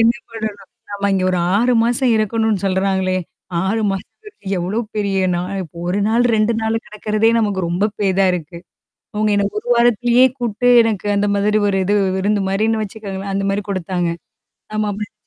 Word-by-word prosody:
என்ன 230 Hz, +1 st, +5 dB, 0.2 s
பண்ணணும்? 215 Hz, -3 st, -6 dB, 0.2 s
நம்ம 200 Hz, 0 st, -1 dB
இங்க 185 Hz, -1 st, 0 dB
ஒரு 180 Hz, -, 0 dB, 0.2 s
6 245 Hz, +4 st, +2 dB
மாசம் 245 Hz, +1 st, +2 dB
இருக்கணும்னு 215 Hz, -1 st, 0 dB
சொல்றாங்களே, 190 Hz, -1 st, 0 dB, 0.5 s
6 220 Hz, +4 st, 0 dB
மாசம்ன்றது 420 Hz, -, -8 dB, 0.2 s
எவ்ளோ 185 Hz, +6 st, -2 dB, 0.2 s
பெரிய 200 Hz, -2 st, 0 dB, 0.2 s
நாள் 185 Hz, +2 st, -3 dB
இப்ப 170 Hz, -1 st, -13 dB
1 185 Hz, +3 st, 0 dB
நாள் 235 Hz, +2 st, +2 dB
2 215 Hz, +1 st, +2 dB
நாள் 220 Hz, 0 st, 0 dB
கிடக்குறதே 215 Hz, +1 st, 0 dB
நமக்கு 205 Hz, -4 st, 0 dB
ரொம்ப 175 Hz, +4 st, 0 dB
பெரிதா 195 Hz, -1 st, +2 dB
இருக்கு. 170 Hz, 0 st, -5 dB, 0.6 s
அவங்க 215 Hz, 0 st, +1 dB
என்ன 200 Hz, 0 st, +2 dB
1 230 Hz, -, -9 dB
வாரத்திலயே 240 Hz, +1 st, +4 dB
கூப்பிட்டு 240 Hz, 0 st, 0 dB
எனக்கு 215 Hz, -3 st, -2 dB
அந்த 205 Hz, +1 st, +1 dB
மாதிரி 205 Hz, +1 st, +1 dB
ஒரு 195 Hz, -1 st, +1 dB
இது 205 Hz, +3 st, +1 dB, 0.2 s
விருந்து 205 Hz, +2 st, +1 dB
மாரின்னு 220 Hz, +3 st, +1 dB
வச்சுக்கோங்களேன், 195 Hz, -2 st, -6 dB
அந்த 195 Hz, 0 st, -1 dB
மாரி 200 Hz, +1 st, -1 dB
குடுத்தாங்க. 180 Hz, -2 st, -2 dB, 0.7 s
ஆமா, 215 Hz, -, 0 dB
அப்டிருந்துச்சு 205 Hz, +1 st, -6 dB
205 Hz, 165 wpm, -18 LUFS, 195-220 Hz, 0.7 s, என்ன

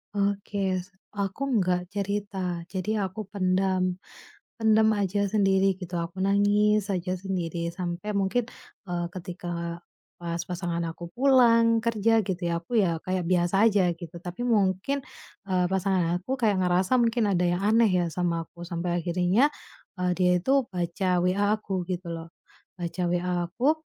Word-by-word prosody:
Oke. 200 Hz, -1 st, 0 dB
S 185 Hz, +2 st, -5 dB, 0.2 s
aku 200 Hz, +5 st, -3 dB, 0.2 s
nggak 180 Hz, -1 st, 0 dB
cerita, 195 Hz, -3 st, -3 dB
jadi 190 Hz, +2 st, -4 dB, 0.2 s
aku 210 Hz, +3 st, -6 dB
pendam. 185 Hz, -1 st, +1 dB, 0.6 s
Pendam 220 Hz, -1 st, +4 dB
aja 200 Hz, 0 st, 0 dB
sendiri 195 Hz, -2 st, +2 dB
gitu, 180 Hz, -2 st, -4 dB
aku 170 Hz, +3 st, -3 dB
nangis 205 Hz, +1 st, +3 dB
aja 185 Hz, -1 st, -1 dB
sendiri 175 Hz, -3 st, -3 dB
sampai 175 Hz, +4 st, -4 dB
mungkin, 200 Hz, +5 st, +1 dB, 0.4 s
eee, 175 Hz, -1 st, -2 dB
ketika 175 Hz, -2 st, -5 dB, 0.4 s
pas 170 Hz, 0 st, -3 dB
pasangan 175 Hz, -1 st, -2 dB
aku 170 Hz, +1 st, -8 dB
pulang 230 Hz, -3 st, +4 dB
kerja, 225 Hz, -1 st, +3 dB
gitu 185 Hz, -3 st, -2 dB
ya 170 Hz, 0 st, -1 dB
aku 235 Hz, +6 st, -1 dB
ya 170 Hz, -4 st, +1 dB
kayak 185 Hz, -1 st, -1 dB
biasa 185 Hz, +4 st, +3 dB
aja 195 Hz, -4 st, +3 dB
gitu, 170 Hz, 0 st, -10 dB
tapi 175 Hz, +4 st, -7 dB
mungkin, 210 Hz, +5 st, +1 dB, 0.5 s
eee, 180 Hz, -1 st, +2 dB
pasangan 185 Hz, -2 st, +1 dB
aku 260 Hz, +8 st, -3 dB
kayak 210 Hz, -4 st, +3 dB
ngerasa 180 Hz, +7 st, +2 dB
mungkin 230 Hz, -2 st, +2 dB
ada 180 Hz, -1 st, +1 dB
yang 175 Hz, 0 st, +1 dB
aneh 220 Hz, +2 st, +4 dB
ya 180 Hz, -2 st, +2 dB
sama 170 Hz, 0 st, -1 dB
aku 175 Hz, -, -13 dB
sampai 175 Hz, 0 st, -2 dB
akhirnya, 180 Hz, +10 st, +3 dB, 0.5 s
eee, 180 Hz, 0 st, +1 dB
dia 180 Hz, -1 st, +3 dB
itu 270 Hz, +7 st, +2 dB
baca 175 Hz, +1 st, -2 dB
WA 185 Hz, +3 st, +1 dB, 0.2 s
aku 190 Hz, -3 st, -2 dB
gitu 180 Hz, -1 st, -4 dB
loh. 165 Hz, 0 st, -7 dB, 0.5 s
Baca 175 Hz, +1 st, -3 dB
WA 175 Hz, 0 st, 0 dB
aku, 275 Hz, -, +2 dB
185 Hz, 150 wpm, -27 LUFS, 175-205 Hz, 0.6 s, Pendam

